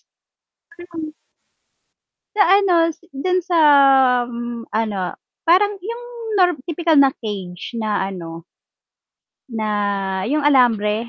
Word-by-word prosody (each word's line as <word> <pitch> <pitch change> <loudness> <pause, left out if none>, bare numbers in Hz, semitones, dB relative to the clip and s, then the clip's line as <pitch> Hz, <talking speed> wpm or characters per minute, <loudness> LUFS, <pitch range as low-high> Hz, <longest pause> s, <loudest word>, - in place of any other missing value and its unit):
Kasi - - -50 0.6
nung 320 -3 -7 1.2
Sa 410 - +5
ano, 390 -1 +4 0.2
si 345 +2 -27
do'n 360 +6 -1
sa, 350 -1 -1 0.7
um, 235 0 -6
ano, 215 -3 -2 0.4
parang 390 +4 +3
yung 465 +5 -6 0.4
norm 355 -7 +2
tipikal 335 +1 0
na 280 -2 +5
cage 200 -3 -7
na 215 -4 -2
ano 165 -3 -8 1.0
na 225 -2 -4 0.6
yung 300 +1 0
alambre. 230 -5 +2
270 Hz, 110 wpm, -19 LUFS, 215-350 Hz, 1.2 s, Sa